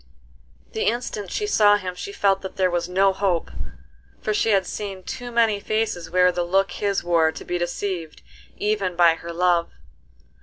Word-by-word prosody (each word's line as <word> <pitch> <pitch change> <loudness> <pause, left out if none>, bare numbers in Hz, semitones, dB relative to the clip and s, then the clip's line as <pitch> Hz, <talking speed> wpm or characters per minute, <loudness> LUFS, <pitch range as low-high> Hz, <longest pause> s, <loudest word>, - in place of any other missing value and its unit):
The 220 - -2
instant 220 -4 -2
she 420 - -2
saw 210 - +5
him 185 -2 -5
she 180 +2 -7
felt 195 -1 +1
that 190 - -7
there 185 -1 +2
was 175 0 -1
no 190 +1 +3
hope, 190 -4 -1 0.7
for 215 - -1
she 220 - +1
had 195 -3 +3
seen 195 -3 -6
too 245 +4 -6
many 225 -3 +2
faces 210 -5 -2
wear 180 +1 +4
the 180 - -2
look 190 +2 +1
his 200 +1 -1
wore 165 -2 +3
to - - -10
be 175 0 -2
deceived 175 -1 -4 0.3
even 205 -4 -1
by 170 -1 +6
her 170 +1 -8
love. 175 0 +2
190 Hz, 180 wpm, -23 LUFS, 175-205 Hz, 0.7 s, by